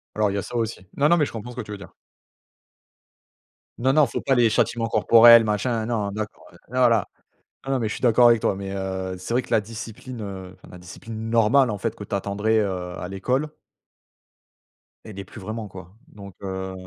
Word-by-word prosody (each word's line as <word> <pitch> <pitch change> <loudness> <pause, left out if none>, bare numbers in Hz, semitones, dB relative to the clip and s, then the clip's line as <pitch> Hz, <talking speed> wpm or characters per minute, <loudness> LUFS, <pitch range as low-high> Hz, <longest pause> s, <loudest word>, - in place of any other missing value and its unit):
Alors 105 -2 +1
il - - -4
y - - -1
a - - -1
ça 120 - -8
aussi. 110 -5 -3
Non 145 +1 +4
non, 170 - +5
mais 150 - +2
je - - -7
comprends 115 +2 -7
ce - - -12
que - - -2
tu 105 -2 -10
veux 105 - -5
dire. 95 - -13 1.8
Non 130 +3 +1
non, 150 -1 +5
faut - - -4
pas 135 - +1
les 120 -2 +4
châtiments 115 +1 0
corporels, 115 +1 +7
machin, 110 +2 -1
non, 110 -4 -2
d'accord, 105 0 -6
ouais, - - -18 0.2
non 125 -1 +4
là 115 -4 +2 0.6
non, 135 - -1
non, 135 - +1
mais 110 - -1
je - - -4
suis - - -9
d'accord 120 0 +6
avec 115 -2 +4
toi. - - +1
Mais 95 0 -6
heu, 95 -1 -4
c'est 95 +6 -4
vrai 125 - +2
que - - -16
la 110 - +3
discipline, 115 +3 -9
heu, 95 -2 -7
enfin - - -18
la 90 - -11
discipline 110 +5 -8
normale, 115 +3 +4
en 105 - -4
fait, 115 +2 -3
que 105 - -8
tu 100 - -5
attendrais, 105 +3 0
heu, 90 -3 -2
à 90 - -5
l'école 125 +10 -1 1.6
elle 105 -3 -10
y - - -4
est - - -11
plus 100 - -12
vraiment, 110 +2 -5
quoi. 95 +1 -12
Donc 100 -3 -12
heu 95 -1 -5
110 Hz, 230 wpm, -23 LUFS, 100-120 Hz, 1.8 s, corporels